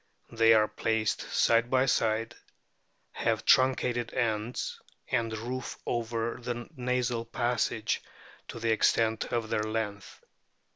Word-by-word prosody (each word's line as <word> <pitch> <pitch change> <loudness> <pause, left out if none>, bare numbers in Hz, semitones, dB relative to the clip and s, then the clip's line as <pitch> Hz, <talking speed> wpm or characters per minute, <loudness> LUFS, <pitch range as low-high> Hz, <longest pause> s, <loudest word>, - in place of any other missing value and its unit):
They 115 0 +5
are 105 -1 +4
placed 110 -1 -1
side 115 +1 +3
by 130 0 +3
side, 115 -1 +1 0.8
have - - -1
truncated 125 -2 +3
ends, 115 -1 -2 0.3
and 115 -3 0
roof 125 +3 -5
over 115 0 -2
the 120 0 -4
nasal 125 -2 -1
passage 115 -2 -1 0.5
to - - -7
the 115 0 +1
extent 110 0 +2
of 115 -2 -3
their 105 - +1
length. 110 -2 -4
115 Hz, 115 wpm, -29 LUFS, 110-120 Hz, 0.8 s, They